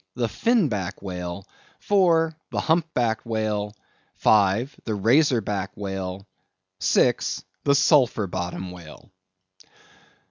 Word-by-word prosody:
the 120 -2 0
Fin 230 - +2
Back 100 -6 -4
Whale; 90 0 -6 0.3
IV. 170 -5 +3 0.2
the - - -2
Hump 165 0 +1
backed 115 -2 0
Whale; 110 -2 -2 0.4
V. 105 +3 +3 0.2
the 110 - -2
Razor 120 +5 +3
Back 100 -2 -3
Whale; 95 -1 -5 0.6
VI. - - +3 0.5
the 140 - +4
Sulphur 135 -7 +3
Bottom 90 0 -5
Whale. 90 +1 -13
110 Hz, 110 wpm, -24 LUFS, 95-140 Hz, 0.6 s, the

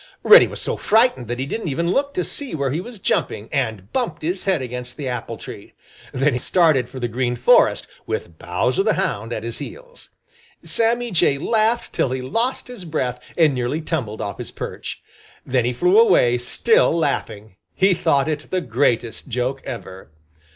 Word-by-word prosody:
Reddy 455 +3 +8
was - - -7
so - - -2
frightened 220 - +2
that 120 +1 -3
he 130 - -2
didn't 205 +7 -4
even 170 +4 0
look 280 +6 +1
to 370 - -1
see 280 - -3
where 140 -3 -1
he 160 +5 -1
was 235 +3 -9
jumping, 110 - -1
and 110 -7 -2
bumped 175 -12 -2
his 180 +4 -2
head 190 -4 +2
against 125 -1 -6
the 145 -3 -4
apple 125 -3 -4
tree. - - -10 0.4
Then 135 +2 +1
he 125 - -1
started 155 -7 +3
for 130 - -8
the 120 - -1
Green 120 +1 -1
Forest, - - +4 0.2
with 85 -2 -4
Bowser 95 - 0
the 215 +2 +2
Hound 120 - -2
at 110 - -4
his 115 0 -4
heels. - - -10 0.5
Sammy 235 +1 +1
Jay 155 -5 +3
laughed 225 +8 0
till - - +1
he 130 0 -3
lost 230 - -2
his 245 -6 -9
breath 130 -7 -2 0.2
and 160 -4 +4
nearly 125 +4 -1
tumbled 135 -10 -3
off 100 - -5
his - - -6
perch. - - -7 0.4
Then 125 -2 +1
he 120 - +1
flew 180 - +4
away, 125 - +4
still 450 - +2
laughing. 110 - -2 0.2
He 190 0 +4
thought 150 -5 +1
it 155 -1 -3
the 185 - 0
greatest 120 -4 -1
joke 130 +2 -2
ever. 95 -7 -8
140 Hz, 185 wpm, -21 LUFS, 120-190 Hz, 0.5 s, Reddy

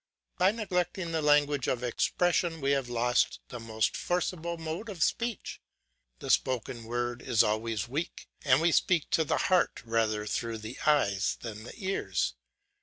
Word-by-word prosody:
By 185 +1 +6
neglecting 185 -5 -2
the 160 -1 0
language 145 -2 +3
of 125 -1 -1
expression 170 +6 +1
we 140 -1 +1
have 135 -3 0
lost 120 +1 +1
the 125 - -6
most 110 -1 -1
forcible 170 -1 -2
mode 165 +7 -5
of 185 -6 -1
speech. 235 -3 -2 0.6
The - - -2
spoken 120 -2 0
word 120 +1 -2
is 110 - +3
always 110 0 -1
weak, 150 +7 -4 0.2
and 135 0 +4
we 170 +1 +4
speak 170 -1 +2
to 160 - +3
the 150 - 0
heart 185 -1 +2
rather 110 -2 0
through 115 +1 -2
the 110 +3 -8
eyes 100 -10 +2
than 110 -1 -7
the - - -9
ears. 195 -3 -1
135 Hz, 160 wpm, -29 LUFS, 115-170 Hz, 0.6 s, By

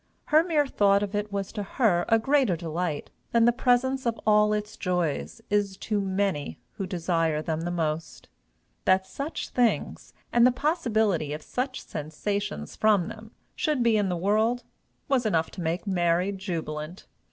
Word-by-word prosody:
Her 310 +1 +7
mere 315 -4 +2
thought 200 -6 +3
of 205 0 -4
it 205 0 -2
was 200 -1 -3
to 210 - -4
her 195 -4 +1
a 225 - +6
greater 265 -4 +2
delight 165 -1 -3 0.2
than 230 -1 +5
the 240 - +6
presence 260 +1 +1
of 230 -1 -1
all 210 0 +5
its 210 0 -2
joys 180 +3 -2
is 205 -2 +1
to 210 0 -1
many 190 - -1
who 195 - -5
desire 165 -3 0
them 160 -1 -2
the 175 - -2
most. 160 -2 -3 0.6
That 190 0 +4
such 280 +10 -5
things, 245 -2 0 0.2
and 240 - +5
the 250 - +7
possibility 220 - 0
of 150 0 -6
such 255 +1 -3
sensations 155 - -4
from 210 -5 +3
them, 220 0 -10 0.3
should 300 -7 0
be 230 -2 +4
in 205 -2 +2
the 180 - -1
world, 220 +6 +1 0.4
was 270 -3 +2
enough 165 -7 +1
to - - -7
make 170 +3 -2
Mary 180 0 +1
jubilant. 170 -3 -5
200 Hz, 165 wpm, -27 LUFS, 175-230 Hz, 0.6 s, Her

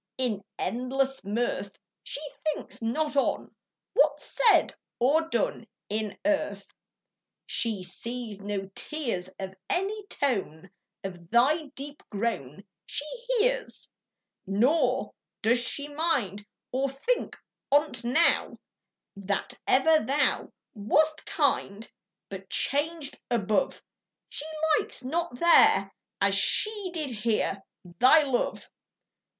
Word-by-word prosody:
In 225 -6 -1
endless 265 +3 -1
mirth, 225 +5 -2 0.2
She 285 - -2 0.2
thinks 310 -5 -3
not 290 +6 -1
on 275 - 0 0.4
What's - - +2
said 455 - +5 0.2
or 310 +7 +3
done - - -1 0.2
In 215 -1 -2
earth: 205 -10 0 0.8
She 220 -5 +1
sees 220 +3 -5
no 200 -1 -4
tears, 235 - -3
Or 190 -1 -5
any 400 +3 -1
tone 195 - -2 0.3
Of 175 -3 -8
thy 290 - +3
deep 285 +1 -6
groan 195 - -3 0.2
She 290 - 0 0.2
hears; - - 0 0.6
Nor 245 - +2 0.3
does 235 +3 +4
she 285 +4 -1
mind, 265 - -1 0.2
Or 270 +2 0
think 370 - -1 0.3
on't 285 -4 +2
now, 260 +8 +2 0.6
That 200 0 -2
ever 310 +4 +5
thou 280 +5 +1 0.2
Wast 305 +9 +1
kind: 225 -8 0 0.4
But 195 -1 -9
changed 290 +3 0
above, 215 -3 0 0.5
She 295 - -3 0.3
likes - - -6
not 325 +1 -2
there, 340 +5 +5 0.3
As - - +3
she 420 -3 +2
did 310 -6 -3
here, 215 -3 0 0.2
Thy 255 - +5
love. 265 -4 -1
255 Hz, 105 wpm, -28 LUFS, 205-310 Hz, 0.8 s, said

